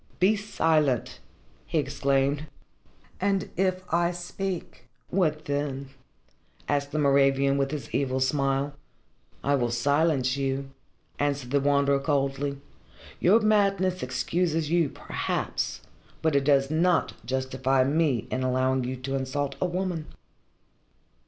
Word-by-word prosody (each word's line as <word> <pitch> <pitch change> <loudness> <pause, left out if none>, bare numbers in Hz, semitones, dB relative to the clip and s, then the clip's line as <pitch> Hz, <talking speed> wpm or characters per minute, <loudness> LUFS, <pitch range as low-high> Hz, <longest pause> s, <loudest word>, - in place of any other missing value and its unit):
"Be 190 +5 +4
silent!" 155 - +1 0.5
he - - -1
exclaimed. 140 +2 0 0.7
"And 195 0 0
if 185 +1 0
I 170 0 +3
speak, 180 +1 -5 0.2
what 155 -5 +1
then?" 140 -1 -2 0.8
asked 145 -1 0
the 155 - -2
Moravian 140 -1 +3
with 135 0 +1
his 150 -1 -6
evil 130 -2 0
smile. 135 +1 +1 0.7
"I 140 - +2
will 125 -4 +1
silence 140 +2 +2
you," 135 0 -2 0.5
answered 140 -3 -1
the 140 - +3
Wanderer 140 0 +3
coldly. 140 -1 -1 0.6
"Your 210 +6 +5
madness 195 -4 +2
excuses 160 +5 -1
you, 170 -4 +3
perhaps, - - -3 0.4
but 160 -2 +2
it 140 -1 +2
does 140 -1 +3
not 170 +2 +2
justify 130 0 +1
me 140 -4 +1
in 130 - -1
allowing 130 0 +1
you 130 +1 -3
to 130 +1 -5
insult 135 +1 -2
a 185 - +2
woman." 180 -3 -3
140 Hz, 120 wpm, -27 LUFS, 135-165 Hz, 0.8 s, Your